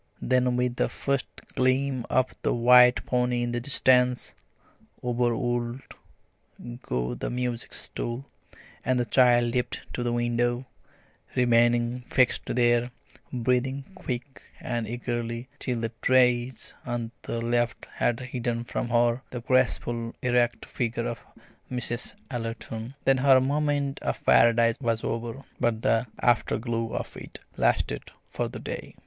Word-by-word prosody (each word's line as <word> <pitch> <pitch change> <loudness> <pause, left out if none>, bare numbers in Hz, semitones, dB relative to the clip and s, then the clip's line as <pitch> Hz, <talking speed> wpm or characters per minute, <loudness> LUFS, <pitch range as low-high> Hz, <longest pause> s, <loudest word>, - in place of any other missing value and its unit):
Then 125 -1 +2
with 125 0 0
the - - +1
first 140 -1 -1 0.3
gleam 130 0 +1
of 130 0 +2
the - - +1
white 125 +1 +6
pony 125 -1 +1
in 120 - -1
the 120 - -1
distance, 125 -1 +2 0.7
over 120 -1 +1
would 120 0 -2 1.0
go 60 - -2
the - - -4
music 125 -1 -3
stool, 120 +3 -4 0.6
and 130 0 +1
the 120 - +1
child 120 -1 +4
leapt 125 -1 -1
to - - -3
the 120 0 0
window, 120 +1 0 0.7
remaining 120 0 +3
fixed 125 -2 +2
there, 120 0 +2 0.4
breathing 125 +2 0
quick 130 -6 -6 0.2
and 120 -3 -3
eagerly 120 +1 -4
till 120 -2 -2
the 115 -1 -2
trees 125 -1 +2
on 120 -2 -3
the 115 - -4
left 120 0 0
had 120 -1 +1
hidden 120 -2 -3
from 120 - -3
her 120 +1 +2
the 125 - -6
graceful 120 -2 +1
erect 120 -2 +1
figure 120 -1 -2
of 120 - -3 0.5
Mrs. 125 -1 -3 0.2
Ellerton. 115 0 -5
Then 135 -1 +4
her 135 0 +6
moment 145 0 0
of - - -3
Paradise 115 0 +5
was 115 -3 0
over; 115 +3 -3 0.2
but 115 -1 0
the 115 +2 +2
afterglow 115 -1 +1
of - - -4
it - - -9 0.2
lasted - - 0 0.2
for - - -1
the - - -7
day. - - -7
120 Hz, 135 wpm, -27 LUFS, 120-125 Hz, 1.0 s, white